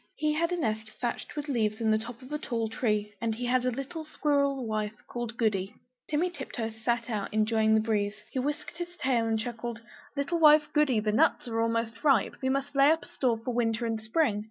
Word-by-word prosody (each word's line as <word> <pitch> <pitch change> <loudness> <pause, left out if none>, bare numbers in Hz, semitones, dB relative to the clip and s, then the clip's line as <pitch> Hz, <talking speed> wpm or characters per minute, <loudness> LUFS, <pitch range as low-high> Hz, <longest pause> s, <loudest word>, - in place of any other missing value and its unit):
He 305 0 +1
had 335 +3 0
a 355 - 0
nest 220 -7 -1
thatched 240 +3 -3
with 295 0 -4
leaves 220 -5 0
in 220 -1 +2
the 215 - +3
top 235 +3 -9
of 255 - -12
a 300 - -1
tall 230 -6 -2
tree; 210 -2 -1
and 225 -1 0
he 245 +2 -4
had 250 +1 +2
a - - +3
little 275 +6 -5
squirrel 280 -4 +1
wife 215 -1 -2
called 240 -1 -5
Goody. 200 -4 0 0.3
Timmy 330 +4 +1
Tiptoes 240 -7 -5
sat 235 -1 +1
out, 210 -4 -3
enjoying 220 0 +3
the 220 - +4
breeze; 210 -2 0 0.2
he 260 - -1
whisked 295 +5 -3
his 350 0 -5
tail 250 -6 +1
and 225 0 +1
chuckled 235 0 -5 0.4
"Little 285 +5 0
wife 300 -1 +7
Goody, 295 -7 +3
the 215 0 0
nuts 220 - +3
are 230 0 0
ripe; 275 -8 +3
we 260 - 0
must 275 +1 -1
lay 275 +1 +6
up 320 +1 +2
a - - -13
store 245 -4 +1
for 250 - -1
winter 230 -1 0
and 225 -1 -2
spring." 220 -1 +1
240 Hz, 220 wpm, -29 LUFS, 220-280 Hz, 0.4 s, wife